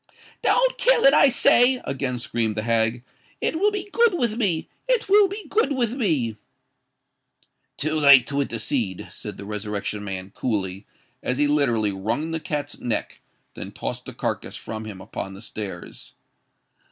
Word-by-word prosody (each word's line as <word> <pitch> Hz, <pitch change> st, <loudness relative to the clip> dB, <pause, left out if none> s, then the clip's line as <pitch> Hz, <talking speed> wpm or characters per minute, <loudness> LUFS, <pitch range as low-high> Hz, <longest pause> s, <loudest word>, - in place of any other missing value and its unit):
"Don't -, -, +2 dB
kill -, -, +4 dB
it, 275 Hz, -, +7 dB
I 285 Hz, -, +7 dB
say!" 245 Hz, +1 st, +5 dB
again 130 Hz, -2 st, -2 dB
screamed 115 Hz, -2 st, -2 dB
the 110 Hz, -, -2 dB
hag: 115 Hz, +1 st, +1 dB, 0.4 s
"it 320 Hz, -, -1 dB
will 410 Hz, +3 st, +4 dB
be 410 Hz, -1 st, -4 dB
good 465 Hz, -5 st, +4 dB
with 235 Hz, -6 st, 0 dB
me—it 235 Hz, -, -1 dB
will 405 Hz, +1 st, +6 dB
be 400 Hz, +1 st, -7 dB
good 340 Hz, -6 st, +1 dB
with 240 Hz, -4 st, 0 dB
me." 150 Hz, -, 0 dB, 1.4 s
"Too 155 Hz, +1 st, -1 dB
late 140 Hz, -4 st, +8 dB
to 140 Hz, +1 st, -1 dB
intercede," 115 Hz, -6 st, -2 dB
said -, -, -8 dB
the 100 Hz, -, -8 dB
Resurrection 105 Hz, 0 st, -4 dB
Man, 95 Hz, -1 st, -5 dB
coolly, 100 Hz, -4 st, -3 dB, 0.3 s
as 125 Hz, -, -1 dB
he 145 Hz, -, +3 dB
literally 125 Hz, -8 st, +2 dB
wrung 115 Hz, +12 st, -2 dB
the 165 Hz, -, -1 dB
cat's 145 Hz, -2 st, -4 dB
neck: 120 Hz, -, -3 dB, 0.3 s
then -, -, -7 dB
he -, -, -12 dB
tossed -, -, -5 dB
the -, -, -8 dB
carcass -, -, -3 dB
from 110 Hz, 0 st, -6 dB
him 100 Hz, -3 st, -8 dB
upon 95 Hz, -1 st, -6 dB
the -, -, -11 dB
stairs. 105 Hz, -3 st, -8 dB
135 Hz, 165 wpm, -24 LUFS, -, 1.4 s, late